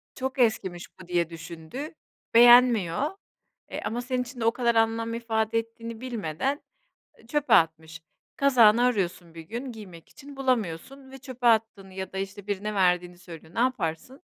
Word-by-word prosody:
Çok 265 Hz, 0 st, -4 dB
eskimiş 190 Hz, -7 st, 0 dB
bu 180 Hz, -, -12 dB
diye 175 Hz, -2 st, 0 dB
düşündü, 165 Hz, -, -8 dB, 0.4 s
beğenmiyor. 240 Hz, -, +6 dB, 0.6 s
Eee -, -, -4 dB
ama 240 Hz, +2 st, -2 dB
senin 250 Hz, 0 st, -2 dB
için 250 Hz, 0 st, -11 dB
de -, -, 0 dB
o 230 Hz, -, +5 dB
kadar 235 Hz, -1 st, 0 dB
anlam 225 Hz, 0 st, +1 dB
ifade 225 Hz, -1 st, 0 dB
ettiğini 230 Hz, 0 st, -8 dB
bilmeden 240 Hz, -, -3 dB, 0.7 s
çöpe 295 Hz, +2 st, 0 dB
atmış. 160 Hz, 0 st, +2 dB, 0.3 s
Kazağını 240 Hz, -4 st, +5 dB
arıyorsun 180 Hz, -8 st, -1 dB
bir 165 Hz, -, -8 dB
gün 240 Hz, +9 st, -6 dB
giymek 185 Hz, -7 st, -12 dB
için 285 Hz, -1 st, -13 dB
bulamıyorsun 260 Hz, +2 st, -2 dB
ve 270 Hz, -, -10 dB
çöpe 255 Hz, -2 st, -3 dB
attığını 215 Hz, -4 st, +1 dB
ya 190 Hz, 0 st, -6 dB
da -, -, -5 dB
işte 195 Hz, +1 st, -6 dB
birine 205 Hz, +1 st, -3 dB
verdiğini 180 Hz, -2 st, +1 dB
söylüyor, 165 Hz, -2 st, -13 dB
ne -, -, -1 dB
yaparsın? 250 Hz, -, -2 dB
225 Hz, 155 wpm, -26 LUFS, 180-250 Hz, 0.7 s, beğenmiyor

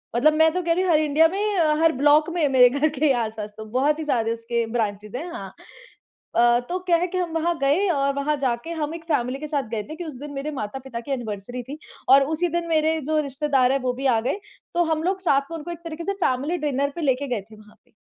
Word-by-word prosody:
मतलब 305 Hz, +6 st, +4 dB
मैं 320 Hz, +1 st, +4 dB
तो 365 Hz, -, 0 dB
कह 335 Hz, 0 st, +2 dB
रही 365 Hz, +2 st, +1 dB
हूँ 365 Hz, -, +2 dB
हर 310 Hz, -, +5 dB
इंडिया 310 Hz, +2 st, +4 dB
में 410 Hz, 0 st, 0 dB, 0.2 s
हर 325 Hz, -, +5 dB
ब्लॉक 295 Hz, +3 st, +4 dB
में 340 Hz, -3 st, +1 dB
मेरे 250 Hz, -2 st, +6 dB
घर 285 Hz, +4 st, +1 dB
के 300 Hz, +1 st, -1 dB
ही 280 Hz, -, +5 dB
आस-पास 215 Hz, -1 st, -6 dB
तो 220 Hz, -, -7 dB
बहुत 275 Hz, +7 st, +1 dB
ही -, -, -2 dB
सारे 230 Hz, -5 st, +1 dB
उसके 230 Hz, 0 st, -2 dB
ब्रांचेज 210 Hz, -1 st, -2 dB
हैं, 330 Hz, +7 st, -4 dB
हाँ -, -, -7 dB, 0.8 s
अ, 240 Hz, 0 st, +5 dB
तो 365 Hz, -, -1 dB
क्या 340 Hz, -, +5 dB
है 355 Hz, +2 st, 0 dB
कि 370 Hz, +1 st, -4 dB
हम 355 Hz, -2 st, -1 dB
वहाँ 335 Hz, +1 st, 0 dB
गए 295 Hz, +9 st, +2 dB
और 280 Hz, -4 st, +1 dB
वहाँ 290 Hz, +2 st, 0 dB
जाके 255 Hz, +5 st, -1 dB
हम 300 Hz, +2 st, -2 dB
एक 335 Hz, -, -9 dB
फैमिली 265 Hz, -4 st, -1 dB
के 305 Hz, -, -5 dB
साथ 285 Hz, -6 st, -2 dB
गए 215 Hz, -2 st, -2 dB
थे 310 Hz, -, -6 dB
कि 350 Hz, +1 st, -6 dB
उस 300 Hz, -5 st, -7 dB
दिन 290 Hz, 0 st, -7 dB
मेरे 275 Hz, +2 st, -4 dB
माता-पिता 260 Hz, -1 st, -5 dB
की 275 Hz, -, -7 dB
एनिवर्सरी 240 Hz, 0 st, -4 dB
थी 275 Hz, +5 st, -8 dB, 0.3 s
और 275 Hz, +1 st, +8 dB
उसी 350 Hz, +3 st, 0 dB
दिन 335 Hz, -, -7 dB
मेरे 315 Hz, 0 st, +2 dB
जो 310 Hz, -, +2 dB
रिश्तेदार 270 Hz, -2 st, +2 dB
है 275 Hz, -, +1 dB
वो 250 Hz, -, +1 dB
भी 270 Hz, +2 st, -6 dB
आ 240 Hz, -4 st, +4 dB
गए। 270 Hz, -, -2 dB, 0.3 s
तो 345 Hz, 0 st, +3 dB
हम 315 Hz, 0 st, 0 dB
लोग 375 Hz, +2 st, -1 dB
साथ 280 Hz, -6 st, +3 dB
में 330 Hz, -, -4 dB
उनको 335 Hz, +2 st, -7 dB
एक 340 Hz, -, -7 dB
तरीके 330 Hz, 0 st, -6 dB
से 395 Hz, -, 0 dB
फैमिली 275 Hz, +7 st, 0 dB
डिनर 280 Hz, 0 st, 0 dB
पे 340 Hz, -, -4 dB
लेके 280 Hz, -1 st, 0 dB
गए 240 Hz, -5 st, -2 dB
थे 215 Hz, -, -12 dB
वहाँ 210 Hz, 0 st, -18 dB
पे। -, -, -32 dB
285 Hz, 265 wpm, -23 LUFS, 250-325 Hz, 0.8 s, और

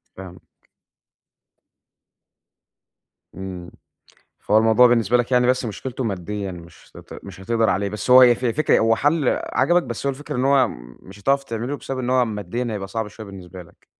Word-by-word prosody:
فاهمك. 90 Hz, -1 st, -14 dB, 2.7 s
إمم، 90 Hz, -2 st, -8 dB, 0.7 s
فهو 105 Hz, -, +2 dB
الموضوع 115 Hz, +3 st, +5 dB
بالنسبة 120 Hz, -1 st, +2 dB
لك 120 Hz, +1 st, -1 dB
يعني 125 Hz, 0 st, +3 dB
بس 125 Hz, 0 st, +1 dB
مشكلته 125 Hz, +4 st, -5 dB
ماديًا 100 Hz, -1 st, -4 dB
مش 85 Hz, -1 st, -14 dB
هت -, -, -12 dB
مش -, -, -11 dB
هتقدر 115 Hz, +3 st, 0 dB
عليه، 100 Hz, +2 st, -1 dB
بس 105 Hz, +4 st, -5 dB
هو 125 Hz, -1 st, +8 dB
ف 125 Hz, -, -8 dB
فكرة 125 Hz, +6 st, +2 dB
هو 115 Hz, 0 st, +2 dB
حل 145 Hz, 0 st, +1 dB, 0.2 s
عَجَبك 175 Hz, +7 st, +2 dB
بس 120 Hz, +1 st, -6 dB
هو -, -, +2 dB
الفكرة 145 Hz, +1 st, -7 dB
إن 125 Hz, -, 0 dB
هو، 135 Hz, -3 st, +4 dB, 0.3 s
مش 95 Hz, +2 st, -14 dB
هتعرف 140 Hz, +5 st, +1 dB
تعمله 120 Hz, +4 st, -4 dB
بسبب 135 Hz, -2 st, -6 dB
إن 125 Hz, -1 st, -2 dB
هو 130 Hz, -1 st, +3 dB
ماديًا 110 Hz, +2 st, -4 dB
هيبقى 100 Hz, -2 st, -5 dB
صعب 110 Hz, +1 st, -4 dB
شويّة 110 Hz, +1 st, -11 dB
بالنسبة 95 Hz, -2 st, -11 dB
لك. 85 Hz, -, -23 dB
115 Hz, 165 wpm, -21 LUFS, 100-130 Hz, 2.7 s, هو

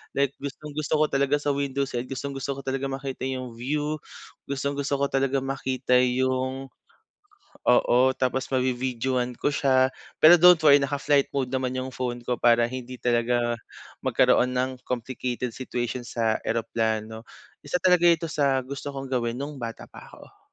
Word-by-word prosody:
like 140 Hz, -1 st, +2 dB
gustong-gusto 150 Hz, +2 st, -5 dB
ko 155 Hz, -, +5 dB
talaga 140 Hz, +1 st, +2 dB
sa 145 Hz, -, -1 dB
window 140 Hz, -1 st, -1 dB
side, 120 Hz, -2 st, -4 dB
gustong-gusto 135 Hz, +1 st, -4 dB
ko -, -, -6 dB
talaga 135 Hz, 0 st, -2 dB
makita 135 Hz, -1 st, -5 dB
yung 130 Hz, -3 st, -5 dB
view. 150 Hz, +5 st, -2 dB, 0.5 s
Gustong-gusto 140 Hz, +1 st, -2 dB
ko 140 Hz, -, +2 dB
talaga 135 Hz, 0 st, +1 dB
makita 130 Hz, -2 st, -1 dB
yung 130 Hz, +1 st, 0 dB, 1.0 s
oo, 125 Hz, 0 st, +4 dB, 0.2 s
tapos 130 Hz, 0 st, -1 dB
mavi-videohan 125 Hz, -1 st, -1 dB
ko -, -, 0 dB
siya. 130 Hz, -2 st, +3 dB, 0.3 s
Pero 165 Hz, +3 st, +10 dB
don't 180 Hz, -2 st, +8 dB
worry 145 Hz, -1 st, +8 dB
naka-flight 140 Hz, 0 st, +1 dB
mode 130 Hz, -2 st, -1 dB
naman 130 Hz, -1 st, -1 dB
yung 130 Hz, 0 st, -3 dB
phone 125 Hz, -1 st, -3 dB
ko 125 Hz, 0 st, -1 dB
para 120 Hz, 0 st, +5 dB
hindi 130 Hz, 0 st, -6 dB
talaga 120 Hz, 0 st, +1 dB, 0.5 s
magkaroon 125 Hz, +1 st, +3 dB
ng 130 Hz, +1 st, 0 dB, 0.2 s
complicated 125 Hz, 0 st, -3 dB
situation 125 Hz, -1 st, -4 dB
sa 115 Hz, -2 st, 0 dB
eroplano. 110 Hz, -1 st, -2 dB, 0.4 s
Isa 145 Hz, +4 st, -1 dB
talaga 180 Hz, -2 st, +4 dB
ito 165 Hz, -1 st, +3 dB
sa 140 Hz, -3 st, +2 dB
gusto 140 Hz, +2 st, -6 dB
kong 135 Hz, -1 st, -6 dB
gawin 120 Hz, -2 st, 0 dB
nung 140 Hz, +2 st, -5 dB
bata 115 Hz, -1 st, -6 dB
pa -, -, -13 dB
ako. -, -, -16 dB
130 Hz, 150 wpm, -25 LUFS, 125-140 Hz, 1.0 s, Pero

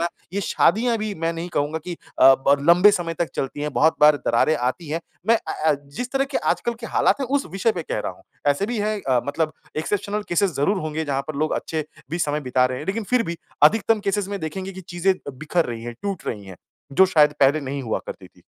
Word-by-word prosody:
ना 170 Hz, -, +1 dB, 0.2 s
ये 200 Hz, -, -1 dB
शादियाँ 230 Hz, +5 st, +2 dB
भी 215 Hz, -1 st, -3 dB
मैं 165 Hz, -1 st, -1 dB
नहीं 170 Hz, +1 st, -5 dB
कहूँगा 145 Hz, +2 st, 0 dB
कि 180 Hz, -, -4 dB
अ, 135 Hz, -4 st, +4 dB
ब 140 Hz, -, +6 dB
लंबे 180 Hz, +4 st, +8 dB
समय 175 Hz, -4 st, -2 dB
तक 170 Hz, 0 st, -1 dB
चलती 135 Hz, +2 st, -3 dB
हैं, 150 Hz, 0 st, -2 dB
बहुत 160 Hz, +3 st, +3 dB
बार 150 Hz, 0 st, +7 dB
दरारें 120 Hz, +7 st, +3 dB
आती 135 Hz, +6 st, -2 dB
हैं। 160 Hz, +3 st, -2 dB, 0.3 s
मैं 230 Hz, -, +6 dB
अ -, -, -5 dB, 0.2 s
अ, 150 Hz, -, +3 dB, 0.2 s
जिस 250 Hz, 0 st, -3 dB
तरह 270 Hz, 0 st, +2 dB
के -, -, +3 dB
आजकल 235 Hz, -, -3 dB
के 230 Hz, -, -5 dB
हालात -, -, +2 dB
हैं, 270 Hz, -, -1 dB
उस 280 Hz, +2 st, 0 dB
विषय 195 Hz, +4 st, +1 dB
पे 175 Hz, -, -4 dB
कह -, -, -3 dB
रहा -, -, -4 dB
हूँ। -, -, -20 dB, 0.3 s
ऐसे 145 Hz, +8 st, 0 dB
भी 240 Hz, 0 st, -3 dB
हैं 215 Hz, +1 st, 0 dB
अ, 130 Hz, -2 st, +2 dB
मतलब 155 Hz, +2 st, -1 dB, 0.2 s
एक्सेप्शनल 205 Hz, +6 st, -2 dB
केसेज़ 185 Hz, +1 st, +2 dB
ज़रूर 170 Hz, +9 st, +1 dB
होंगे 155 Hz, +1 st, -3 dB
जहाँ 140 Hz, -1 st, -1 dB
पर 155 Hz, -, -4 dB
लोग 155 Hz, +1 st, 0 dB
अच्छे 155 Hz, -1 st, -3 dB, 0.3 s
भी 170 Hz, -, -2 dB
समय 150 Hz, -2 st, 0 dB
बिता 125 Hz, -2 st, +2 dB
रहे 125 Hz, 0 st, -4 dB
हैं। -, -, -8 dB
लेकिन 210 Hz, +3 st, -2 dB
फ़िर 250 Hz, -, +4 dB
भी 170 Hz, -, -4 dB, 0.3 s
अधिकतम 220 Hz, +6 st, +4 dB
केसेज़ 200 Hz, 0 st, -1 dB
में 200 Hz, -, -3 dB
देखेंगे 185 Hz, +5 st, -5 dB
कि 190 Hz, -, -9 dB
चीज़ें 180 Hz, +2 st, 0 dB, 0.2 s
बिखर 155 Hz, +5 st, 0 dB
रही 115 Hz, -2 st, -5 dB
हैं, 120 Hz, 0 st, -6 dB
टूट 195 Hz, -5 st, -4 dB
रही 105 Hz, -3 st, -4 dB
हैं, 95 Hz, -2 st, -11 dB, 0.4 s
जो 190 Hz, +5 st, +6 dB
शायद 150 Hz, -5 st, +4 dB
पहले 140 Hz, +3 st, +4 dB
नहीं 140 Hz, 0 st, -4 dB
हुआ 110 Hz, -3 st, -1 dB
करती -, -, -8 dB
थी। -, -, -25 dB
165 Hz, 245 wpm, -23 LUFS, 145-200 Hz, 0.4 s, लंबे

